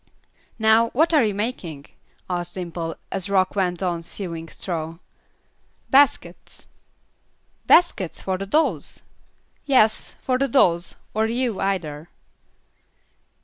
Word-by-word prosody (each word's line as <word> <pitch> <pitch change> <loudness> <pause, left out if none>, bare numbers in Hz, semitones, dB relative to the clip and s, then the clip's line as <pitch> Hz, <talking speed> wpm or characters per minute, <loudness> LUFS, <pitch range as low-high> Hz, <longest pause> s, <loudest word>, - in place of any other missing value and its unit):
"Now 220 +1 +4
what 320 +5 +3
are 295 -5 +5
you 210 -3 0
making?" 185 - -4 0.4
asked 175 -1 -3
Dimple, 170 -2 -4 0.2
as 195 0 -3
Rock 190 -1 +2
went 180 -2 -1
on 175 -2 -1
sewing 165 -2 -7
straw. 165 -2 -5 0.9
"Baskets." 280 0 +2 1.0
"Baskets, 270 - +3
for 185 -1 -2
the 195 - -5
dolls?" 310 +10 0 0.6
"Yes, 220 -6 +3
for 255 -1 0
the 275 - +2
dolls, 175 -11 +2 0.2
or 220 +1 +1
you 235 -2 -1
either." 165 -5 -3
195 Hz, 110 wpm, -23 LUFS, 170-230 Hz, 1.0 s, are